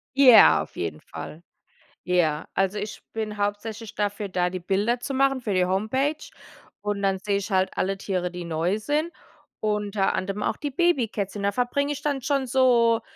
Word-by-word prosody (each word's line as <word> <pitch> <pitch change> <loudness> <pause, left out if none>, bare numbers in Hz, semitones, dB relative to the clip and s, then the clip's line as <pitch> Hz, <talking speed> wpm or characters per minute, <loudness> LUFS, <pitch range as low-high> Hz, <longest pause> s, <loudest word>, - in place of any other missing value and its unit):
Ja, 260 -5 +8
auf - - -16
jeden 80 -3 -4
Fall. 165 +3 -9 0.6
Ja. 165 -4 +1
Also, 195 +2 0
ich 210 -1 -6
bin 215 -1 -4
hauptsächlich 205 +2 -3
dafür 205 -1 -2
da, 180 -1 0
die 185 0 -5
Bilder 205 +7 0
zu 275 - -4
machen, 270 -1 +2
für 210 -4 -2
die 180 -1 +3
Homepage. 220 +11 0 0.7
Und 205 -1 -2
dann 195 -1 +1
seh 200 0 0
ich 200 +1 -5
halt 190 0 +2
alle 195 +1 0
Tiere, 180 -2 -2
die 175 -1 -6
neu 170 +5 0
sind, 300 +8 -1 0.5
unter 210 -2 0
anderem 195 +2 -2
auch - - 0
die 290 -2 -4
Babykätzchen. 225 - 0
Da 200 - +2
verbringe 270 +5 0
ich 290 0 -4
dann 285 -3 -1
schon 275 -1 0
so 235 -3 +4
210 Hz, 180 wpm, -25 LUFS, 190-250 Hz, 0.7 s, Ja